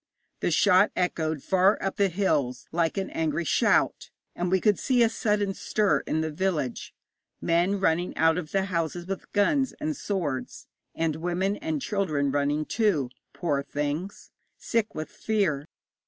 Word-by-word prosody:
The - - 0
shot 185 +3 +5
echoed 160 -4 -1
far 190 +2 +3
up 195 - -3
the 200 -1 +3
hills 145 -9 0
like 165 +2 0
an 195 - -2
angry 160 0 -1
shout, - - +2 0.3
and 175 0 -1
we 190 +1 +3
could 210 +1 +2
see 250 -3 +3
a 230 - +4
sudden 210 -3 0
stir 210 +1 +1
in 160 - 0
the 160 0 -2
village 155 -7 -2 0.4
men 175 +4 +1
running 175 -1 0
out 160 +1 +3
of 155 -4 -7
the 195 -1 +1
houses 170 -2 -2
with 190 0 -6
guns 265 +6 +2
and 310 0 -3
swords, 165 - -3 0.3
and 160 -2 0
women 180 +4 -1
and 315 -4 -3
children 155 - 0
running, 145 +2 0
too, 170 - +1 0.2
poor 145 -6 -1
things! 150 +6 -4 0.3
sick 230 -2 -1
with 155 +5 -5
fear. 200 -9 -1
180 Hz, 155 wpm, -27 LUFS, 155-200 Hz, 0.4 s, shot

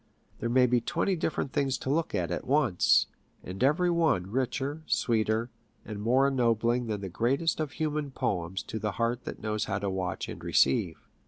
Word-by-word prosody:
There 120 - -2
may 125 +1 +5
be 125 -1 +2
twenty 190 - 0
different 160 -4 -2
things 135 -2 +1
to 130 - -3
look 160 +2 0
at 90 -1 -1
at 85 - -4
once, 130 -9 +4 0.4
and 95 +4 -4
every 170 +6 +3
one 155 - +1
richer, 135 +4 -2
sweeter, 110 0 +1 0.3
and 105 -2 -6
more 130 +5 +3
ennobling 120 -2 +1
than 105 -2 -3
the 95 - -4
greatest 130 - 0
of 155 -3 -2
human 150 -2 -2
poems 95 -7 -2
to 110 - -5
the 105 -2 -2
heart 120 +3 -1
that - - -7
knows 110 -1 -1
how 100 - -2
to 100 -1 -2
watch 95 -1 -3
and - - -8
receive. 80 +5 +2
120 Hz, 185 wpm, -29 LUFS, 105-140 Hz, 0.4 s, may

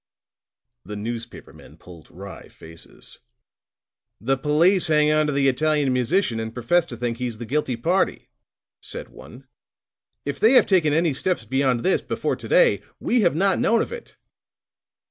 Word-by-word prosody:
The 105 +3 -8
newspaper 115 +3 -7
men - - -16
pulled 85 -4 -15
wry 95 +2 -11
faces. 80 +1 -14 1.0
"The 135 +5 0
police 160 +7 +2
hang 150 -1 +3
onto 155 -1 +2
the 140 -1 +1
Italian 145 0 +1
musician 125 - 0
and 110 0 -4
profess 140 +9 +1
to 120 - -8
think 120 -1 -3
he's 120 -3 -4
the 120 - -7
guilty 135 0 -1
party," 170 +11 -1 0.5
said - - -8
one. - - -14 0.8
"If - - -4
they 225 +4 +5
have 255 - +6
taken 175 -6 +2
any 160 0 +1
steps 155 -3 -2
beyond 130 0 0
this, 190 - +2
before - - -2
to - - -10
day, - - +3 0.2
we 245 -1 +1
have 175 -6 +2
not 190 +2 +2
known 230 - +2
of - - -9
it." 480 -1 -10
140 Hz, 160 wpm, -23 LUFS, 120-175 Hz, 1.0 s, have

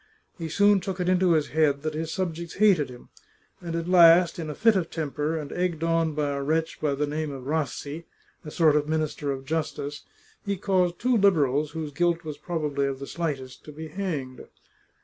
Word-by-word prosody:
He 165 -2 -5
soon 205 +4 +4
took 190 0 -5
it 180 - -1
into 185 -1 +3
his 155 -2 +1
head 150 -2 +1
that 155 0 -2
his 160 +1 -3
subjects 170 -2 -4
hated 195 -9 +4
him, 125 -1 -13 0.5
and 170 -2 -4
at 170 0 -3
last, 175 -1 +6
in 160 -2 -4
a 150 - -5
fit 225 -1 +4
of 180 -4 0
temper, 155 0 -2
and 150 -2 -6
egged 175 -3 -2
on 165 -2 +1
by 150 -1 0
a 140 0 -2
wretch 160 +3 -1
by 145 -2 +1
the 150 +2 0
name 155 +1 -3
of 135 -2 -7
Rassi, 150 +1 -3 0.4
a 150 - -7
sort 155 -1 +3
of 150 0 +1
Minister 155 -2 -1
of 135 -1 -5
Justice, 150 -1 -3 0.4
he 200 -1 -2
caused 180 -2 +1
two 250 0 +1
Liberals, 155 - +2
whose 160 -2 -4
guilt 170 +2 0
was 155 -2 -7
probably 150 -5 -1
of 135 -1 -3
the 140 - -7
slightest, 140 -6 -4
to 150 - -9
be 155 +1 -8
hanged. 150 -8 -4
160 Hz, 205 wpm, -26 LUFS, 145-175 Hz, 0.5 s, last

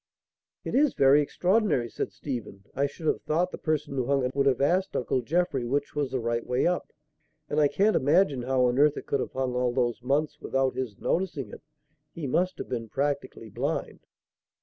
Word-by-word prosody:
"It - - -5
is 285 +1 +3
very 140 +2 +6
extraordinary," 180 - +1
said - - -4
Stephen. 110 -8 -6
"I 140 +2 +1
should 160 +3 -11
have - - +1
thought 165 +4 0
the - - -7
person 155 -3 -1
who 130 -3 -1
hung 140 -2 +2
it 125 - -2
would 140 0 +2
have 135 - +3
asked 180 +7 +1
Uncle 125 +1 0
Jeffrey 145 0 0
which 140 +4 -1
was 145 -2 -1
the 130 0 -2
right 115 0 -1
way 125 +1 0
up; 180 0 0 0.6
and 150 - 0
I 150 - +5
can't 205 +8 +2
imagine 145 -1 +3
how 130 0 +2
on 125 +2 +1
earth 150 0 +4
it - - -6
could 140 - 0
have - - -4
hung 130 -1 -1
all 125 0 +1
those 120 -2 0
months 150 +4 -1
without 135 0 0
his 120 -7 -4
noticing 165 -7 -2
it. - - -10 0.5
He 165 - -5
must 180 +7 0
have - - -6
been 115 -3 -4
practically 140 -5 -3
blind." - - -3
140 Hz, 205 wpm, -27 LUFS, 125-155 Hz, 0.6 s, very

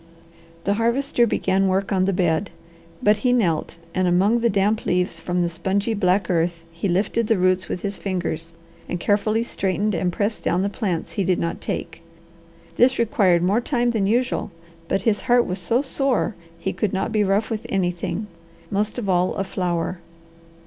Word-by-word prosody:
The 200 - +1
Harvester 235 +2 +2
began 195 -2 +1
work 190 +2 0
on 185 -2 +2
the 195 - +2
bed, 175 0 +1 0.5
but 210 -1 +5
he 245 +4 +1
knelt 175 -11 +1 0.2
and 185 0 +1
among 195 +7 +3
the 235 0 +2
damp 205 +2 +1
leaves 180 -1 0
from 175 +1 -1
the - - +1
spongy 190 +6 -1
black 195 -1 +2
earth 170 -1 0
he 170 +4 -3
lifted 205 +5 +1
the 225 - +3
roots 185 0 +2
with 180 - -4
his 200 -1 -3
fingers 170 -3 -3 0.3
and 175 - -2
carefully 215 +4 +1
straightened 205 -1 -1
and 180 +1 0
pressed 210 +4 -2
down 180 +3 +1
the 200 - 0
plants 195 -6 -3
he 200 - -1
did 185 -1 +2
not 170 - -3
take. - - -4 0.8
This 255 +2 +4
required 205 -8 +3
more 200 +6 +2
time 240 -2 +1
than 210 -4 0
usual, 245 +3 0 0.4
but 195 0 0
his 215 -2 +2
heart 245 -1 +3
was 185 +2 -3
so 230 +9 +1
sore 270 -4 0 0.2
he - - -3
could 185 +2 -1
not 195 +4 -1
be 215 -1 +2
rough 205 +3 +1
with 215 -1 -3
anything, 180 +1 -1 0.5
most 210 +3 -1
of 235 -5 -3
all 180 -1 +2
a 195 - -1
flower. 180 -2 -2
195 Hz, 185 wpm, -23 LUFS, 180-220 Hz, 0.8 s, but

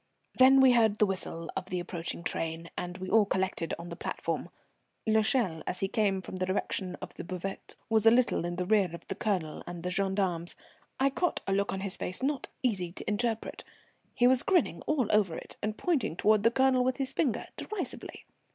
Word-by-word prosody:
Then 265 +1 +7
we 260 -1 +7
heard 220 -3 +4
the 210 - +5
whistle 185 -4 -4
of 190 -1 -3
the 180 - -1
approaching 170 -1 -4
train, 165 0 -3
and 180 0 -4
we 185 0 -6
all 220 +1 +5
collected 185 -3 -1
on 170 +1 -8
the 170 - -6
platform. - - -3 0.6
L'Echelle, 220 - +2
as 180 - -1
he 195 - +2
came 195 -2 +1
from 185 - -7
the 185 - 0
direction 185 -1 -2
of - - -7
the - - -7
buvette, 185 +2 -6
was 220 -2 +3
a - - +12
little 240 -4 +3
in 175 0 -3
the 180 0 -2
rear 200 -2 +3
of - - -13
the - - 0
Colonel 185 -9 -2
and 175 -1 -7
the 180 - -2
gendarmes. 190 -3 0 0.4
I 275 +1 +3
caught 355 +5 0
a 195 - 0
look 200 +1 +1
on 190 - -3
his 195 -1 -3
face 185 +8 -2
not 280 0 -1 0.2
easy 190 -8 0
to - - -8
interpret. 225 +1 -1 0.5
He 245 - +3
was 250 0 +5
grinning 365 -4 +2
all 295 -5 +2
over 200 -6 +2
it - - -8
and 215 +1 -2
pointing 315 - 0
toward 215 +3 +3
the 230 - +5
Colonel 260 +1 +3
with 255 0 0
his 270 -2 -2
finger, 265 -10 0
derisively. 430 - -4
200 Hz, 205 wpm, -30 LUFS, 180-240 Hz, 0.6 s, a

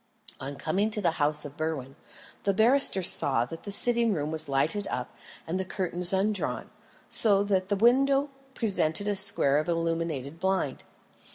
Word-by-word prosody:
On 140 +2 -7
coming 195 +9 -1
to 215 - 0
the 170 -5 -1
house 150 +1 +1
of 145 -1 -9
Berwin, 145 -4 -4 0.5
the 200 -1 -1
barrister 225 -3 +4
saw 135 -8 +1
that 165 +6 -10
the 200 - -5
sitting 235 +1 +4
room 150 -1 -3
was 155 -2 -1
lighted 155 +9 -1
up 125 - -5 0.3
and 175 +3 -3
the - - -1
curtains 180 -1 -1
undrawn, 195 +1 -2 0.4
so 200 -3 +1
that 190 -2 -1
the 200 - 0
window 275 +6 +2 0.2
presented 200 -4 +1
a 205 - 0
square 190 -8 +4
of 155 - -4
illuminated 165 -3 -3
blind. 185 -7 -2
185 Hz, 165 wpm, -27 LUFS, 155-205 Hz, 0.5 s, barrister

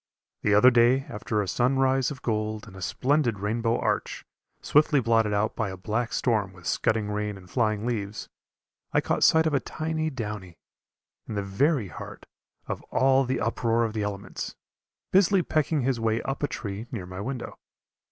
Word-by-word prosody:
The 105 - +3
other 125 +5 +7
day 120 +2 +4
after 105 -1 -2
a - - -6
sun 125 +6 +1
rise 130 -1 +2
of 140 -4 -8
gold 110 -1 -2
and 105 -4 -13
a 95 - -10
splendid 130 +1 +1
rainbow 115 +3 0
arch, - - -2 0.3
swiftly 150 -1 +3
blotted 115 -3 +2
out 105 +1 0
by 110 -4 -1
a 95 - -7
black 110 +5 -2
storm 105 -6 0
with 90 -3 -15
scudding 110 -2 0
rain 105 -1 -2
and 90 -1 -14
flying 110 0 0
leaves, 110 -3 -3 0.7
I - - +4
caught - - 0
sight 160 0 +5
of 155 - +1
a 140 - +3
tiny 155 +4 -2
downy, 105 - -6 0.7
in 110 - -5
the 100 - -1
very 110 - +1
heart - - -9 0.4
of - - -4
all 135 0 +3
the 130 - -1
uproar 115 0 +1
of 110 -2 -2
the 110 - -2
elements, 100 -1 -5 0.6
busily 195 -1 +4
pecking 155 -1 +1
his 130 -2 0
way 115 0 +1
up 135 +1 -3
a 145 - +1
tree 110 -3 -5
near 105 -7 -4
my 90 +2 -7
window. 125 +2 -5
115 Hz, 180 wpm, -26 LUFS, 105-135 Hz, 0.7 s, other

